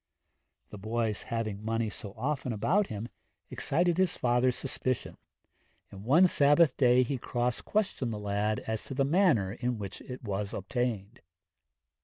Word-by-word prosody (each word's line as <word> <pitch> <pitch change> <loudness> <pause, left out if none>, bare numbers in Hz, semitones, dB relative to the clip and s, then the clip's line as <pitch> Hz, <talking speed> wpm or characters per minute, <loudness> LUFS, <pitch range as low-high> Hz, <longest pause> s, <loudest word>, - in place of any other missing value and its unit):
The 105 - -8
boy's 110 0 -1
having 110 -3 -3
money 115 0 -1
so 100 0 -9
often 130 +1 -2
about 190 - +1
him 110 +2 -5 0.4
excited 175 +4 +1
his 185 -3 +2
father's 125 0 +2
suspicion, 130 -2 -3 0.8
and 100 0 -10
one 150 - +5
Sabbath 145 -3 +4
day 125 -1 +4
he 130 +1 -3
cross 120 0 -1
questioned 200 - -1
the 110 - -4
lad 105 +1 -1
as 110 -1 -4
to 135 - -6
the 135 0 +2
manner 140 - +3
in 120 +1 -2
which 100 -2 -7
it 125 0 -9
was 100 -2 -3
obtained. 110 +1 -3
120 Hz, 150 wpm, -30 LUFS, 105-135 Hz, 0.8 s, one